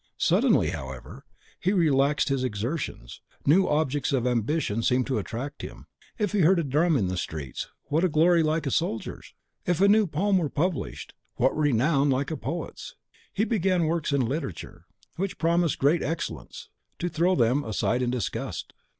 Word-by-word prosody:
Suddenly, - - +3
however, 65 -1 -8 0.3
he 190 - +1
relaxed 145 -5 +2
his 135 -2 0
exertions; 120 - -4 0.2
new 180 +7 +4
objects 150 -2 0
of 130 -3 +1
ambition 120 -1 0
seemed 125 +2 +2
to 130 -5 -1
attract 125 +8 -6
him. - - -9 0.3
If 210 -3 0
he 210 - 0
heard 180 +2 +5
a 170 - +1
drum 150 +3 +2
in 105 - +1
the 90 0 -3
streets, 75 -6 -5 0.2
what 165 +4 +1
glory 165 +3 +4
like 155 +1 +1
the 140 - -2
soldier's? 140 -9 -3 0.3
If 175 -2 +1
a 200 - +5
new 210 0 +5
poem 190 +5 +1
were 155 -4 -1
published, 170 +4 -3 0.2
what 130 - +2
renown 145 0 +2
like 135 +1 0
the 160 - -2
poet's? 150 +9 -6 0.4
He 210 - 0
began 190 -6 +1
works 160 -1 -1
in 140 -1 +2
literature, 135 - -5 0.3
which 195 +2 -3
promised 170 0 +1
great 150 +5 +3
excellence, 165 +3 -5 0.3
to 175 - -2
throw 175 +2 +1
them 125 +1 +2
aside 115 +3 0
in 125 - 0
disgust. 120 -5 -4
150 Hz, 165 wpm, -26 LUFS, 125-170 Hz, 0.4 s, heard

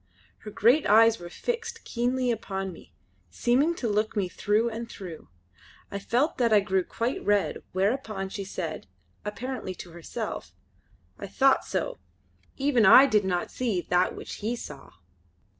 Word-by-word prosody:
Her 215 - -9
great 240 +8 +3
eyes 225 +2 +6
were 175 0 -8
fixed 465 - -4
keenly 250 +1 0
upon 195 -4 -4
me, - - -15 0.4
seeming 275 +8 +2
to 245 - -3
look 215 +1 0
me 200 -3 0
through 210 +5 +1
and 230 0 -5
through. 175 -8 -9 0.6
I 200 - -3
felt 250 +10 0
that 235 -2 +3
I 210 - +7
grew 190 -2 0
quite 235 +7 -3
red, 205 -1 +1
whereupon 200 0 -1
she 200 +1 -5
said, 170 - -5 0.4
apparently 210 -2 -5
to 175 - -10
herself: 170 0 -6 0.6
"I - - -6
thocht 265 +6 +3
so! - - -3 0.6
Even 270 -4 +2
I 235 +7 +9
did 210 -7 +2
not 180 -2 -1
see 230 -7 -1
that 180 +1 +3
which - - -7
he 225 +4 -1
saw." 150 - -9
215 Hz, 155 wpm, -27 LUFS, 190-250 Hz, 0.6 s, I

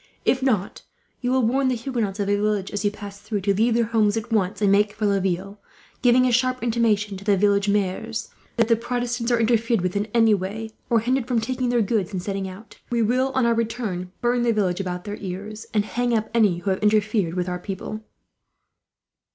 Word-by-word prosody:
If 260 - +2
not, 220 -8 0 0.4
you 245 - -2
will 260 -2 +3
warn 265 +4 +2
the 255 - +1
Huguenots 230 -5 -3
of 200 - +1
the 200 +1 +2
villages, 205 -1 -1
as - - -4
you 205 - +3
pass 205 -1 -10
through, 210 -1 -3
to 200 +1 +2
leave 225 +4 +2
their 235 - +3
homes 220 -1 +2
at 225 +1 -5
once 195 -1 +1
and 205 -2 +3
make 205 +1 +3
for 210 0 -2
Laville; 195 0 -1 0.4
giving 250 0 +5
a 250 - +2
sharp 255 +1 +1
intimation 215 -4 +1
to 195 - -10
the 200 -1 +3
village 200 +1 +2
maires 200 -2 -1 0.3
that, 230 - +5
if 230 - -4
the 230 - +6
Protestants 240 0 -2
are 240 - +3
interfered 230 -1 +2
with 180 +2 -2
in 205 +1 0
any 225 -1 +4
way, 210 +3 -3 0.2
or 230 -2 +3
hindered 250 +1 0
from 245 -3 +1
taking 255 +2 -2
their 240 -2 +2
goods 205 -3 -1
and 180 -2 -3
setting 195 -1 -3
out; 195 +5 -13
we 235 -1 +1
will, 255 +4 +2
on 260 -2 +3
our 235 - +3
return, 220 -6 -3
burn 240 0 +1
the 240 -1 +2
village 190 -4 0
about 180 -2 -3
their 205 0 -5
ears, 205 +3 -7
and 210 -2 +1
hang 245 +1 0
up 220 0 -3
any 210 -7 +3
who 190 +3 -2
have 190 - -1
interfered 210 -4 +2
with 180 -1 -1
our 180 0 -3
people." 195 +3 -6
215 Hz, 225 wpm, -23 LUFS, 200-235 Hz, 0.4 s, the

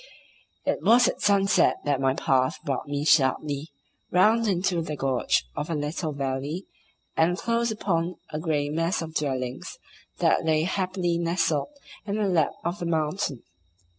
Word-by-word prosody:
It - - 0
was 240 +1 +5
at - - -3
sunset 200 0 +4
that 140 -2 +1
my 135 0 +2
path 130 -2 +1
brought 140 0 -2
me 145 0 -2
sharply 145 0 +2 0.4
round 220 +5 +4
into 180 -3 +1
the 155 -2 -4
gorge 135 - +1
of 150 - -4
a 165 - -1
little 150 +2 -2
valley, 140 +5 -3 0.5
and 170 +2 +2
close 235 +2 0
upon 180 -5 -1 0.2
a 155 - -2
grey 150 -3 -1
mass 165 +3 0
of 160 -1 -8
dwellings 130 -4 -3 0.4
that - - +2
lay 160 -1 +2
happily 180 -1 -1
nestled 165 - 0 0.4
in 200 - -1
the 210 -2 +1
lap 165 -6 +2
of 175 +4 -2
the 175 - -3
mountain. 155 - -1
160 Hz, 155 wpm, -26 LUFS, 145-185 Hz, 0.5 s, was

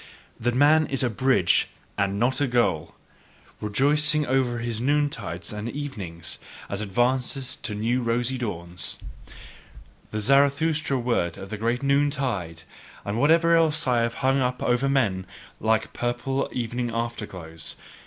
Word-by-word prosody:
That 120 +1 0
man 150 +3 +5
is 135 -1 0
a 125 - +1
bridge 125 -6 +3 0.3
and 100 -1 0
not 130 +4 +1
a 145 - +3
goal 115 -11 0 0.6
rejoicing 145 +8 +2
over 130 -2 +1
his 115 -1 -3
noontides 125 - -1
and 105 +2 -4
evenings, 95 - -5 0.3
as 100 +1 -3
advances 125 +5 0
to 105 - -4
new 115 +4 0
rosy 120 +2 -1
dawns: 90 -6 -3 1.1
The 110 - -3
Zarathustra 140 +4 +3
word 120 -9 0
of 95 +1 -9
the 110 - -3
great 115 +4 -1
noontide, 135 - 0 0.4
and 100 +3 -2
whatever 165 +4 +5
else 160 -1 +3
I 125 -2 +2
have 115 0 -1
hung 135 +1 +3
up 125 0 -1
over 125 +3 +2
men 100 -9 +1 0.3
like 110 0 +1
purple 120 +3 -1
evening 120 0 -2
afterglows. 105 -9 -5
120 Hz, 135 wpm, -25 LUFS, 105-135 Hz, 1.1 s, man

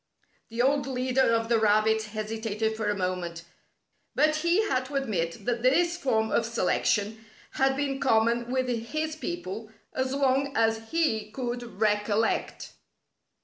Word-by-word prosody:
The 230 +2 0
old 280 +1 +2
leader 255 -1 +1
of 225 0 +1
the 230 -1 +3
rabbits 215 +1 +3
hesitated 220 0 -3
for 215 -1 -2
a 205 - -1
moment, 180 -2 -3 0.7
but 305 0 +3
he 345 +7 +2
had 255 -4 0
to 285 - -8
admit 185 -11 -2
that 240 -1 -1
this 340 +8 +3
form 220 -10 0
of - - +2
selection 220 -1 0 0.3
had 270 0 +1
been 275 -1 -1
common 235 -1 +2
with 255 0 0
his 305 +7 -2
people 225 - -5 0.2
as 260 0 -1
long 275 0 +1
as 225 0 +1
he 225 -11 0
could 240 -2 -5
recollect. 210 +1 0
230 Hz, 145 wpm, -27 LUFS, 220-270 Hz, 0.7 s, the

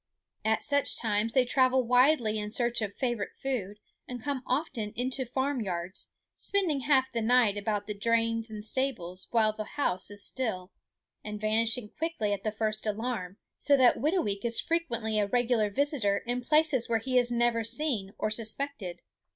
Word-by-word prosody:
At 220 0 +1
such 285 -1 +1
times 220 0 0
they 260 -1 +4
travel 260 0 +3
widely 245 -2 +3
in 210 0 -4
search 240 +1 0
of 205 -2 -3
favorite 240 -6 -2
food 215 -7 -3 0.3
and 250 -1 -6
come 280 -3 -2
often 250 -6 -2
into 260 +2 -1
the - - -20
farm 265 0 -1
yards, 180 -2 -4 0.3
spending 365 -8 +1
half 265 -1 +2
the 235 - -1
night 230 -2 +4
about 205 0 -2
the 210 - -4
drains 230 +2 0
and 215 -1 -7
stables 190 -9 -2
while 220 -2 +3
the 215 0 -4
house 210 -7 -2
is 205 0 -6
still, 200 -8 -3 0.5
and 210 0 -5
vanishing 220 +1 +1
quickly 310 -11 -1
at 200 - -4
the 215 - 0
first 215 0 -2
alarm; 210 -3 -3 0.2
so 285 -1 +4
that 255 -2 +5
Whitooweek 260 - 0
is 235 -1 +3
frequently 235 -10 -1
a 205 - +1
regular 240 -2 +2
visitor 250 -4 +1
in 245 +1 -1
places 300 -3 +2
where 230 - +3
he 255 +3 +2
is 245 0 0
never 235 -1 +2
seen 230 -5 -2
or 215 - -1
suspected. 220 -5 -4
230 Hz, 175 wpm, -29 LUFS, 210-260 Hz, 0.5 s, that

